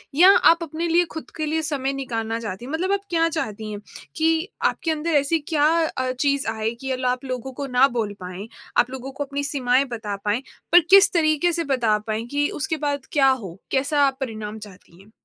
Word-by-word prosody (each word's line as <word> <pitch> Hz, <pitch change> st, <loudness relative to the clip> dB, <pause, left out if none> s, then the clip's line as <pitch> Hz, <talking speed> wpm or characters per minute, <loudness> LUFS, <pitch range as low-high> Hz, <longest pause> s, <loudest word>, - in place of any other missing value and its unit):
या 360 Hz, +6 st, +8 dB, 0.2 s
आप 335 Hz, +1 st, 0 dB
अपने 330 Hz, +2 st, -3 dB
लिए 345 Hz, +1 st, +3 dB
खुद 320 Hz, -, -7 dB
के 310 Hz, -, -1 dB
लिए 320 Hz, +1 st, 0 dB
समय 275 Hz, -3 st, -2 dB
निकालना 230 Hz, -4 st, -3 dB
चाहती 220 Hz, 0 st, -6 dB
हैं? 265 Hz, -, -7 dB
मतलब 355 Hz, +5 st, -1 dB
आप 400 Hz, 0 st, +1 dB
क्या 330 Hz, -1 st, +2 dB
चाहती 220 Hz, -9 st, -4 dB
हैं 205 Hz, -, -5 dB, 0.4 s
कि 325 Hz, +2 st, +1 dB, 0.2 s
आपके 330 Hz, -, -3 dB
अंदर 315 Hz, +1 st, -2 dB
ऐसी 320 Hz, +4 st, 0 dB
क्या 295 Hz, -1 st, +3 dB, 0.3 s
अ, 255 Hz, 0 st, 0 dB
चीज़ 280 Hz, 0 st, +1 dB
आए 220 Hz, 0 st, -2 dB
कि 265 Hz, -1 st, -2 dB
ल 255 Hz, -, -3 dB
आप 250 Hz, +1 st, 0 dB
लोगों 255 Hz, 0 st, -4 dB
को 275 Hz, -, -3 dB
ना 270 Hz, +2 st, +7 dB
बोल 215 Hz, -3 st, -1 dB
पाएँ, 185 Hz, +3 st, -7 dB, 0.3 s
आप 245 Hz, -, +4 dB
लोगों 265 Hz, +1 st, -7 dB
को 285 Hz, +2 st, -4 dB
अपनी 285 Hz, +1 st, -4 dB
सीमाएँ 270 Hz, -2 st, +1 dB
बता 210 Hz, -3 st, -4 dB
पाएँ, 210 Hz, +4 st, +1 dB, 0.3 s
पर 350 Hz, -, +9 dB
किस 395 Hz, +1 st, +8 dB
तरीके 315 Hz, 0 st, +2 dB
से 335 Hz, 0 st, -1 dB
बता 230 Hz, -4 st, +2 dB
पाएँ 220 Hz, +1 st, -2 dB
कि 290 Hz, 0 st, +1 dB
उसके 320 Hz, -3 st, -1 dB
बाद 285 Hz, -2 st, -2 dB
क्या 270 Hz, -3 st, +4 dB
हो, 200 Hz, -10 st, -2 dB
कैसा 285 Hz, +2 st, +1 dB
आप 265 Hz, -1 st, -3 dB
परिणाम 220 Hz, -4 st, -5 dB
चाहती 185 Hz, -2 st, -18 dB
हैं? 210 Hz, +2 st, -20 dB
270 Hz, 215 wpm, -23 LUFS, 225-315 Hz, 0.4 s, पर